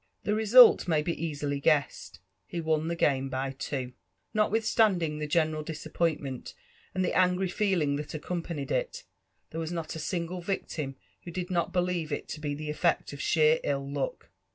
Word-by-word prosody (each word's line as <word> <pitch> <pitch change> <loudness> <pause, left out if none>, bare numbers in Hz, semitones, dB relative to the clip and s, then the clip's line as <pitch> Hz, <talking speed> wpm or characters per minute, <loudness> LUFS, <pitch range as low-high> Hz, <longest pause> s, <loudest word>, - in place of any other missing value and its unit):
The 210 - 0
result 220 +2 +7
may 155 -3 +2
be 170 0 -3
easily 145 -3 -2
guessed 145 -1 0
— 95 - -49
he 175 - -4
won 160 -1 0
the 170 - -1
game 135 -4 +1
by 130 +1 -2
two, 130 -2 -4 0.4
Notwithstanding 215 -7 +2
the 150 - -3
general 155 0 +1
disappointment 155 -3 -3 0.4
and 185 0 +1
the - - -1
angry 180 0 +3
feeling 175 -8 +1
that 150 +1 -6
accompanied 165 -2 -4
it, - - -2 0.5
there 160 - -4
was 160 +1 -4
not 165 -2 -4
a - - -5
single 175 +3 -3
victim 155 -6 -3 0.3
who - - -8
did 180 +1 -4
not 170 -2 0
believe 180 -3 -1
U 145 - 0
to* 150 - -8
be 145 -1 -2
the 150 +1 -6
efiect 165 0 0
of 145 - -6
sheer 155 0 +4
ill 140 -1 -1
luck. 140 -1 -4
160 Hz, 175 wpm, -29 LUFS, 145-180 Hz, 0.5 s, result